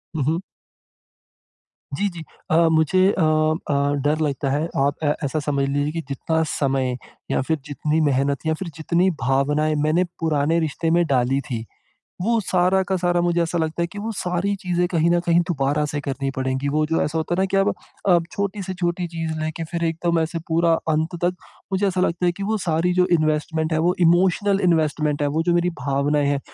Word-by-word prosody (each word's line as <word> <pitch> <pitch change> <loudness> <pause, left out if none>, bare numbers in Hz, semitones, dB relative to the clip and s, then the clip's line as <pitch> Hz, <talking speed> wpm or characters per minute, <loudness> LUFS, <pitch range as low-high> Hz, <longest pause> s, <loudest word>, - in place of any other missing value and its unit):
हुँ, 150 - 0
हुँ। 160 +6 0 1.6
जी, 205 - +1
जी, 170 -3 -8 0.3
अ, 160 - +4 0.2
मुझे 160 +3 +3 0.2
अ 165 - +3
अ, 155 -2 +1
डर 150 +2 +1
लगता 140 -2 -1
है 150 +4 0 0.2
आप 140 +1 +1
अ, 145 -1 +3
ऐसा 140 +3 -1
समझ 140 -2 0
लीजिए 145 +2 0
कि 165 - -3
जितना 160 +4 -1
समय, 130 -3 0 0.3
या - - +1
फिर 160 +4 0
जितनी 150 +2 -1
मेहनत 140 0 +1
या 160 - +2
फिर 190 - -4
जितनी 170 +3 +1
भावनाएँ 145 +4 +1
मैंने 165 +4 +3 0.2
पुराने 160 0 +1
रिश्ते 160 +1 -1
में 170 0 +3
डाली 130 0 +2
थी, 120 -6 -5 0.6
वो 230 +3 +2
सारा 185 -1 +2
का 190 - +1
सारा 175 -1 +1
मुझे 175 0 +1
ऐसा 170 +1 -1
लगता 160 +1 -1
है 170 - +1
कि 205 - -7
वो 220 +2 -3
सारी 180 +3 -1
चीज़ें 180 -1 0
कहीं 170 -2 +2
न 175 - +3
कहीं 170 0 +3
दोबारा 145 -1 0
से 145 - -2
करनी 135 -1 -3
पड़ेगी, 130 +1 -1
वो 155 +2 +1
जो 165 +1 0
ऐसा 160 +2 -1
होता 160 +2 -1
है 180 - 0
ना - - +3
कि - - +4
अब 195 +1 +3 0.4
अ, 175 -2 +6
छोटी 200 0 -3
से 185 0 -5
छोटी 175 0 -1
चीज़ 165 -1 -4
लेके 160 +1 -3
फिर 170 -1 -2
एकदम 165 +1 0
ऐसे 165 +1 -2
पूरा 165 +1 +3 0.2
अंत 160 +2 0
तक 180 - +2 0.4
मुझे 195 +2 +1
ऐसा 185 -1 0
लगता 180 0 0
है 175 - +3
कि 200 +3 -8
वो 220 +2 0
सारी 165 +2 +1
जो 180 0 +3
इन्वेस्टमेंट 155 +1 0
है 155 - +2
वो, 175 +3 +2
इमोशनल 185 +4 +3
इन्वेस्टमेंट 155 -3 +1
है 145 - +2
वो 155 +3 0
जो 175 0 +1
मेरी 175 +1 +2
भावनाएँ 140 +2 +1
हैं 140 -1 0
160 Hz, 205 wpm, -22 LUFS, 145-175 Hz, 1.6 s, अ